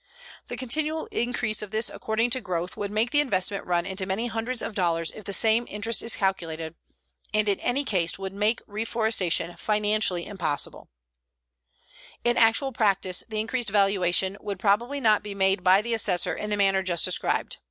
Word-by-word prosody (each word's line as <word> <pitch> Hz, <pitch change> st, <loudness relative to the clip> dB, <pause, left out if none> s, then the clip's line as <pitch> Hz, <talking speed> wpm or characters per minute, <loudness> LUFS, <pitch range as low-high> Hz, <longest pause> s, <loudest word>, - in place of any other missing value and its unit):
The -, -, -6 dB
continual 310 Hz, +5 st, -2 dB
increase 235 Hz, -3 st, -1 dB
of 210 Hz, -, -6 dB
this 220 Hz, +2 st, +1 dB
according 225 Hz, +2 st, -1 dB
to 260 Hz, +1 st, +1 dB
growth 180 Hz, -3 st, -3 dB
would 205 Hz, -1 st, -4 dB
make 220 Hz, +4 st, 0 dB
the 290 Hz, -, +3 dB
investment 200 Hz, -8 st, 0 dB
run 175 Hz, -1 st, 0 dB
into 190 Hz, -1 st, -3 dB
many 200 Hz, +5 st, -1 dB
hundreds 230 Hz, +2 st, -3 dB
of -, -, -4 dB
dollars 165 Hz, -4 st, 0 dB
if 215 Hz, -, -12 dB
the -, -, -4 dB
same 225 Hz, +4 st, +3 dB
interest 210 Hz, +3 st, -1 dB
is 230 Hz, -, +1 dB
calculated, 165 Hz, -5 st, -2 dB, 0.6 s
and 215 Hz, 0 st, +2 dB
in 200 Hz, -2 st, +1 dB
any 260 Hz, +4 st, 0 dB
case 180 Hz, -8 st, 0 dB
would 195 Hz, 0 st, -6 dB
make 210 Hz, +3 st, 0 dB
reforestation 210 Hz, -6 st, 0 dB
financially 210 Hz, -4 st, +1 dB
impossible. 170 Hz, -8 st, -2 dB, 1.3 s
In 240 Hz, 0 st, +2 dB
actual 230 Hz, +4 st, +3 dB
practice, 195 Hz, -5 st, +1 dB
the 215 Hz, -1 st, -2 dB
increased 225 Hz, +1 st, -2 dB
valuation 195 Hz, -1 st, +2 dB
would 205 Hz, -2 st, -5 dB
probably 225 Hz, +8 st, +1 dB
not 215 Hz, -5 st, +3 dB
be 205 Hz, -1 st, -7 dB
made 190 Hz, -1 st, +1 dB
by 190 Hz, +3 st, +5 dB
the 235 Hz, +1 st, -2 dB
assessor 200 Hz, -5 st, +2 dB
in 210 Hz, -, -5 dB
the 210 Hz, -, 0 dB
manner 195 Hz, -1 st, +3 dB
just 175 Hz, -3 st, 0 dB
described. -, -, +1 dB
210 Hz, 175 wpm, -26 LUFS, 190-225 Hz, 1.3 s, by